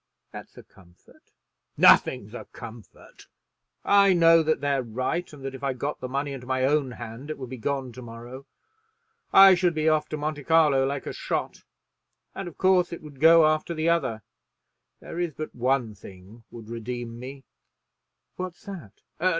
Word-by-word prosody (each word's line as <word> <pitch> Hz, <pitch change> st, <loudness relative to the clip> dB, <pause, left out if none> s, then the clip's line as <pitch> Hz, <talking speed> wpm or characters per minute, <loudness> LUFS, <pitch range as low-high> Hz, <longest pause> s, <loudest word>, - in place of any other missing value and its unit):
"That's -, -, -11 dB
a -, -, -11 dB
comfort." 85 Hz, -2 st, -23 dB, 0.5 s
"Nothing's 115 Hz, -4 st, +4 dB
a -, -, -8 dB
comfort. 115 Hz, -2 st, -13 dB, 0.6 s
I 200 Hz, -1 st, +5 dB
know 165 Hz, -1 st, +6 dB
that 155 Hz, 0 st, 0 dB
they're 140 Hz, -1 st, 0 dB
right, 130 Hz, +9 st, -3 dB
and 140 Hz, -3 st, -11 dB
that 135 Hz, -, -4 dB
if 135 Hz, +1 st, -10 dB
I 135 Hz, -1 st, 0 dB
got 140 Hz, +4 st, -4 dB
the 130 Hz, -, -5 dB
money 140 Hz, +2 st, -3 dB
into 125 Hz, -2 st, -9 dB
my 130 Hz, 0 st, 0 dB
own 140 Hz, -2 st, +1 dB
hand 120 Hz, +5 st, -9 dB
it 155 Hz, -, -4 dB
would 130 Hz, -2 st, -8 dB
be 130 Hz, -, -6 dB
gone 135 Hz, +1 st, -3 dB
to 125 Hz, -, -11 dB
morrow. 120 Hz, +3 st, -10 dB, 0.8 s
I 195 Hz, 0 st, +9 dB
should 175 Hz, -2 st, +1 dB
be 155 Hz, 0 st, 0 dB
off 155 Hz, -1 st, +2 dB
to 155 Hz, -, -4 dB
Monte 150 Hz, 0 st, -4 dB
Carlo 150 Hz, -5 st, +4 dB
like 140 Hz, 0 st, -4 dB
a -, -, -5 dB
shot; -, -, -4 dB, 0.7 s
and, 195 Hz, -, -6 dB
of 175 Hz, -, -10 dB
course 185 Hz, -1 st, +3 dB
it 170 Hz, -, -8 dB
would 145 Hz, -3 st, -13 dB
go 165 Hz, +1 st, +7 dB
after 155 Hz, +2 st, 0 dB
the 160 Hz, +1 st, 0 dB
other. 130 Hz, -11 st, 0 dB, 0.8 s
There 170 Hz, -, -7 dB
is 170 Hz, -5 st, -2 dB
but 155 Hz, -, -6 dB
one 125 Hz, -2 st, 0 dB
thing 100 Hz, +3 st, -15 dB
would 115 Hz, -2 st, -11 dB
redeem 120 Hz, 0 st, -6 dB
me." 135 Hz, +2 st, -9 dB, 0.9 s
"What's 180 Hz, -1 st, -7 dB
that?" 175 Hz, -, -10 dB
140 Hz, 175 wpm, -25 LUFS, 120-160 Hz, 0.9 s, I